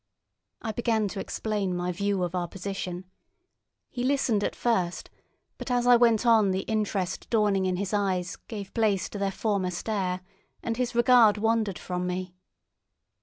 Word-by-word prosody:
I 225 - -2
began 220 -1 0
to 195 - -6
explain 200 -3 -2
my 180 0 -1
view 200 +1 -1
of 175 -1 -2
our 180 -1 -1
position. 185 -1 -5 0.9
He 245 - -3
listened 255 -6 +1
at - - -1
first, 185 -8 -1 0.5
but - - -6
as 245 -1 +1
I 245 0 +7
went 235 -1 +4
on 220 -4 +5
the 190 0 0
interest 205 -4 -2
dawning 205 -4 +2
in 185 - 0
his 195 +2 -3
eyes 190 -1 0
gave 200 -4 -7
place 210 -4 +1
to 205 - -6
their 200 0 +1
former 195 -2 -1
stare, 185 0 -2 0.4
and 230 - -1
his 245 -1 -1
regard 235 -3 +6
wandered 220 -3 +1
from 180 0 -3
me. 180 0 -4
200 Hz, 165 wpm, -27 LUFS, 185-225 Hz, 0.9 s, I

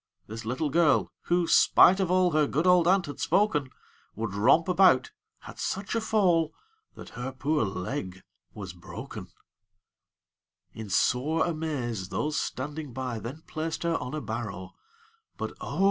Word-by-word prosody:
This 110 +1 -8
little 135 +6 -2
girl, 165 0 +3
who, 175 0 +2
spite 185 +3 +6
of 190 -3 0
all 185 -1 +3
Her 150 -1 +2
good 155 +5 -1
old 180 -2 +5
aunt 190 0 +3
had 145 - -8
spoken, 150 -10 +1 0.5
Would 110 -2 -4
romp 130 +11 +4
about, 190 - +4 0.3
had - - -12
such 195 +1 -3
a 230 - 0
fall 175 -8 +2 0.4
That - - -10
her 125 +2 -6
poor 145 +3 0
leg 95 -1 -4 0.3
was 95 -4 -7
broken. 85 -1 -9 1.5
In 110 -2 -8
sore 140 +11 +1
amaze, 140 - -3
those 150 0 -2
standing 145 +1 -5
by 125 -2 -4
Then 130 +9 -8
placed 160 +1 -4
her 170 0 +1
on 125 - -5
a 155 - -3
barrow; 105 -7 -5 0.7
But - - -4
oh! - - -5
150 Hz, 150 wpm, -27 LUFS, 115-170 Hz, 1.5 s, spite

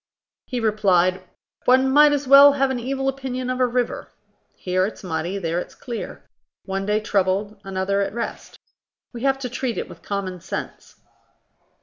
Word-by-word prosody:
He 250 - -3
replied: 190 -5 +2 0.4
"One 260 +1 +4
might 295 +2 +7
as 290 -2 -1
well 280 +1 +9
have 275 -1 +1
an 255 - -2
evil 270 +2 -2
opinion 260 -2 -3
of 255 - -3
a 255 - +3
river: 245 0 -2 0.5
here 185 +1 0
it's 215 - -10
muddy, 175 +2 -3
there 170 -2 -1
it's - - -8
clear; 240 -3 -7 0.4
one 195 0 -3
day 210 +1 +2
troubled, 200 0 -1
another 195 +1 -1
at 200 - -1
rest. 235 +2 -6 0.6
We 235 - -7
have 270 0 +2
to 270 -2 -4
treat 245 -1 -3
it - - -3
with - - -13
common 190 -3 -4
sense." 185 - -7
220 Hz, 165 wpm, -22 LUFS, 195-265 Hz, 0.6 s, well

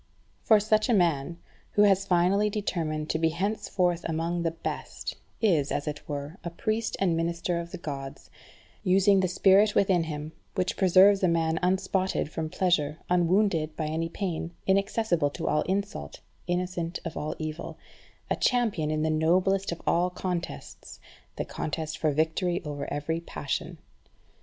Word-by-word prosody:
For 215 -2 +5
such 215 +3 +2
a 235 - +4
man, 170 -3 +1 0.4
who 205 - +5
has 195 -1 +4
finally 185 +4 +3
determined 165 -7 -2
to 160 - -1
be 165 0 +3
henceforth 180 -1 -1
among 165 +2 -1
the 170 - +1
best, 165 - -5 0.3
is, 160 -10 +3
as 145 - -2
it 150 0 -5
were, 145 +4 -5
a 170 - -3
priest 215 +6 -2
and 180 -4 +2
minister 170 +1 -1
of 170 0 -6
the - - -5
Gods, 140 -4 -7 0.5
using 195 +1 +4
the 185 - +2
spirit 195 +3 +4
within 185 -4 +3
him, 150 -1 -5 0.2
which 185 -2 0
preserves 190 +1 +6
a 185 - +4
man 165 -1 +1
unspotted 190 -2 0
from 160 -1 -3
pleasure, 155 -5 +1
unwounded 175 -3 +2
by 155 - -2
any 160 +2 -2
pain, 170 -2 -4
inaccessible 195 -5 +1
to 165 +3 -5
all 150 - +2
insult, 200 +2 -3 0.3
innocent 175 -1 -2
of 165 - -5
all 150 - -3
evil; 155 0 -5 0.5
a - - 0
champion 225 - +1
in 155 0 0
the 160 - +1
noblest 180 +5 +2
of 170 - -6
all 175 +2 +2
contests 180 -1 -5 0.4
the - - -3
contest 155 0 -4
for 155 - +2
victory 160 +4 0
over 145 -1 -5
every 160 +3 -2
passion. 80 - -4
170 Hz, 155 wpm, -27 LUFS, 160-190 Hz, 0.5 s, preserves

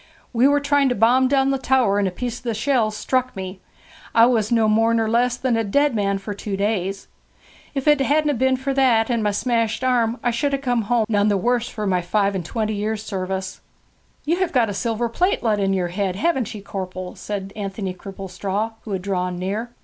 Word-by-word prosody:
'We 245 +3 +4
were 290 0 +3
trying 285 -1 +2
to 245 - 0
bomb 245 +5 +4
down 270 0 +2
the 270 - 0
tower, 250 -7 +2
and 200 - +1
a - - -2
piece 240 +5 -4
of - - -24
the 230 -3 -2
shell 235 -1 +1
struck 255 +4 -1
me. 190 0 -6 0.6
I 230 - +7
was 230 -3 +1
no 225 -2 +3
more 225 +2 +3
nor 225 -1 +1
less 240 +2 +1
than 255 -2 0
a 225 - +1
dead 285 +7 +2
man 200 -2 0
for 195 +2 -6
two 200 0 -4
days. 195 -1 -2 0.7
If 275 +1 -2
it 295 -2 +5
hadn't 295 +2 +2
a - - 0
been 260 +1 +2
for 270 +1 -2
that 250 -4 +3
and 235 -2 +1
my 210 - +1
smashed 225 +2 0
arm 240 -2 +2
I 245 - +2
should 280 +5 -1
have 275 0 -2
come 245 -3 +1
home 235 -2 +3
none 205 -2 +2
the 205 -1 +2
worse 240 +4 0
for 215 -2 -5
my 185 -2 +1
five 200 +3 +1
and 190 -2 -3
twenty 215 +4 -2
years' 215 +1 -2
service.' 190 -1 -4 0.6
'You 335 +4 +1
have 370 -2 0
got 235 -5 +2
a - - -4
silver 230 +3 -1
plate 355 +11 0
let 215 -3 +1
into 195 -1 +1
yer 175 -2 -1
head, 190 0 -2
haven't 260 - 0
ye, 205 - -7
corpel?' 185 -2 -6
said 195 -1 -5
Anthony 195 -2 -4
Cripplestraw, 195 +3 -4
who 210 - -4
had 185 -1 -3
drawn 180 -2 -2
near. 200 +6 -3
225 Hz, 225 wpm, -22 LUFS, 195-250 Hz, 0.7 s, I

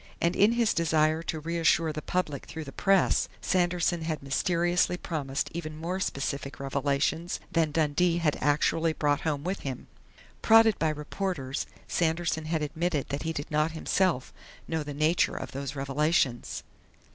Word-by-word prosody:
And 170 +2 +1
in 210 +3 +5
his 235 -2 +2
desire 160 -1 +2
to 160 -1 -3
reassure 165 0 +1
the 155 - -4
public 150 -5 -2
through 160 0 -6
the 140 - -9
press, 195 +3 +2
Sanderson 175 -1 +1
had 155 -3 -3
mysteriously 175 +5 +1
promised 140 -6 -3
even 155 -2 -5
more 175 +4 -3
specific 140 -4 -3
revelations 140 +5 -1
than 165 -2 +2
Dundee 160 +3 +2
had 160 -4 +1
actually 160 +2 +2
brought 145 -2 +1
home 145 -3 -1
with 185 +3 -2
him. 130 -3 -5 0.6
Prodded 225 -2 +6
by 160 - +2
reporters, 150 -2 -3 0.2
Sanderson 165 -1 0
had 155 -1 -1
admitted 155 0 -1
that 140 0 -3
he 160 - -2
did 145 -2 -5
not 155 +1 +1
himself 165 -3 0 0.3
know 160 -1 -1
the 145 -1 -6
nature 155 +4 +2
of - - -5
those 140 +1 -5
revelations. 140 -2 0
160 Hz, 155 wpm, -28 LUFS, 145-170 Hz, 0.6 s, Prodded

